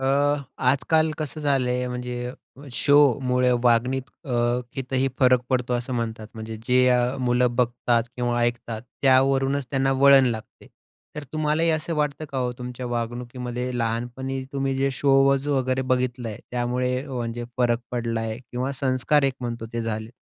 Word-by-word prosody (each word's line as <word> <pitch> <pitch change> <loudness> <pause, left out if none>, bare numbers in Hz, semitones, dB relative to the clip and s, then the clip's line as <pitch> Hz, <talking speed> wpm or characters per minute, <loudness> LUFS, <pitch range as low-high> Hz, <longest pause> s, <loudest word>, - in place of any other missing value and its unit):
अ, 135 - -3 0.7
आजकाल 155 +4 +2
कसं 155 0 -4
झालंय, 125 -3 +1
म्हणजे 125 0 -4 0.4
शोमुळे 130 -3 +3
वागण्यात 125 +2 +3 0.2
अ, 135 - -7 0.4
कितीही 130 0 -1
फरक 125 -2 +5
पडतो 125 -1 0
असं 120 +2 -3
म्हणतात. 115 -2 -3
म्हणजे, 110 0 -6
जे 125 0 +4
अ, 125 +1 +2
मुलं 125 -1 +2
बघतात 120 -1 +1
किंवा 120 -1 0
ऐकतात 120 -2 -2 0.2
त्यावरूनच 135 0 +3
त्यांना 135 -1 +1
वळण 135 0 +6
लागते. 110 -2 -5 0.5
तर 150 - -5
तुम्हालाही 155 +2 +1
असं 160 +1 -1
वाटतं 150 0 -1
का 135 - -1
हो 125 -1 -1
तुमच्या 125 0 -6
वागणुकीमध्ये 120 +1 -4
लहानपणी 120 +4 -2
तुम्ही 135 -1 -1
जे 135 +1 +1
शोज 135 +1 +3
वगैरे 130 -2 +1
बघितलं 125 -2 -1
आहे, 105 - -7
त्यामुळे 125 +1 -1
म्हणजे 120 -2 -4
फरक 120 -2 +3
पडलाय 115 -2 -2
आहे 110 - -5
किंवा 125 +2 -4
संस्कार 135 +2 +2
एक 135 -1 +1
म्हणतो 115 -2 -4
ते 115 - -2
झालेत? 110 0 -4
125 Hz, 150 wpm, -24 LUFS, 120-135 Hz, 0.7 s, वळण